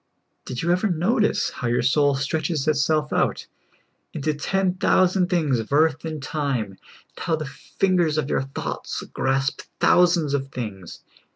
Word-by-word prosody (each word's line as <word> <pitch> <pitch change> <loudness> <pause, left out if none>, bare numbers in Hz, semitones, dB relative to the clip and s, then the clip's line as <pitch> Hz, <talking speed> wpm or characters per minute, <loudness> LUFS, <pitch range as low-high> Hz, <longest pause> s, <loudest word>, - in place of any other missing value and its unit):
Did 125 +2 -4
you 170 - +2
ever 185 +4 +2
notice 190 +6 +1
how 125 - -4
your 120 0 +1
soul 140 +2 +3
stretches 150 +2 -1
itself 155 0 +1
out - - 0 0.7
into 155 0 -1
ten 185 +5 0
thousand 185 0 +2
things 155 -9 +1
of 110 - -6
earth 155 +1 +2
and 155 -1 -4
time, 140 -8 -2
and 95 - -18 0.4
how 165 - 0
the 155 -1 -5
fingers 165 +3 0
of 150 -3 0
your - - 0
thoughts 135 0 -5
grasp 135 +1 0 0.2
thousands 175 -5 +4
of 135 -1 -1
things 105 -10 -7
150 Hz, 155 wpm, -23 LUFS, 135-175 Hz, 0.7 s, thousands